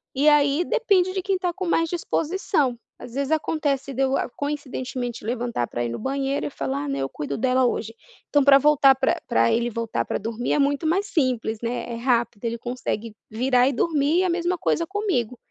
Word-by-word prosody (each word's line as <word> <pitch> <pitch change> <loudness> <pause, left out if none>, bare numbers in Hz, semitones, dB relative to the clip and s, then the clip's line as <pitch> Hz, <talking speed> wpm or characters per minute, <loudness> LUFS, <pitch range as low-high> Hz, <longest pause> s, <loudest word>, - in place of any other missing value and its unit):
e 280 +3 +2
aí 295 +2 +4
depende 375 -5 +2
de 380 - -1
quem 385 0 0
tá 360 -1 -2
com 370 0 -4
mais 330 -1 +2
disposição, 325 - 0 0.2
às 235 - -11
vezes, 280 +2 -2
acontece 290 -3 -1
de 265 - -2
eu, 265 0 +2 0.2
coincidentemente, 260 -4 -4
levantar 235 - -2
pra 120 0 -3
ir - - -2
no 115 - -5
banheiro 270 - -1
e - - -4
falar, 140 +1 -3
né: 135 - -2
"Eu 135 - -1
cuido 140 0 -5
dela 260 +1 +2
hoje". 225 -2 -2 0.3
Então, 290 -1 +3
pra 275 0 +8
voltar, 275 -1 +5
pra 265 0 0
pra 115 0 +3
ele 235 +1 +1
voltar 230 0 -2
pra - - -2
dormir 225 +3 -2
é - - +2
muito 285 +3 +1
mais 375 +6 +1
simples, 250 - -1
né, 240 0 -3
é - - -3
rápido, 235 -2 0
ele 230 0 -1
consegue 230 -2 -4
virar 250 +3 +2
e - - +2
dormir 300 +3 +1
e - - +2
a 370 - +1
mesma 350 +1 0
coisa 335 0 0
comigo. 370 - -1
270 Hz, 205 wpm, -24 LUFS, 235-310 Hz, 0.3 s, pra